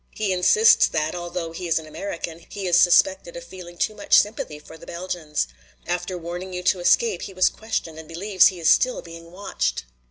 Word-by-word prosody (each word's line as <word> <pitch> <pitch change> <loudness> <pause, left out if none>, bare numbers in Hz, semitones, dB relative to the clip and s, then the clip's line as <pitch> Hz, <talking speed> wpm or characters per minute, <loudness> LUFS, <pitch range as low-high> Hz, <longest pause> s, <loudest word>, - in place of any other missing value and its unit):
"He 210 -3 -1
insists 435 - +5
that, 155 -1 -2
although 175 -1 -5
he 175 +2 -6
is 165 - +2
an 160 - -4
American, 170 0 -6
he 200 - -6
is 175 -2 +2
suspected 285 - +3
of - - -8
feeling 175 - -11
too 215 - 0
much 205 - +3
sympathy 205 -7 0
for 150 +2 -14
the 160 - -14
Belgians. 170 - -3 0.4
After 180 +1 -3
warning 175 +2 -7
you 180 0 -5
to 185 0 +2
escape 445 - +2
he 195 - -8
was 185 - +4
questioned 175 -8 -5
and 160 - -11
believes 185 +3 +3
he 185 -2 -3
is 165 - -1
still 255 +9 +3
being 165 0 -12
watched. 185 - -3
180 Hz, 200 wpm, -23 LUFS, 165-200 Hz, 0.4 s, insists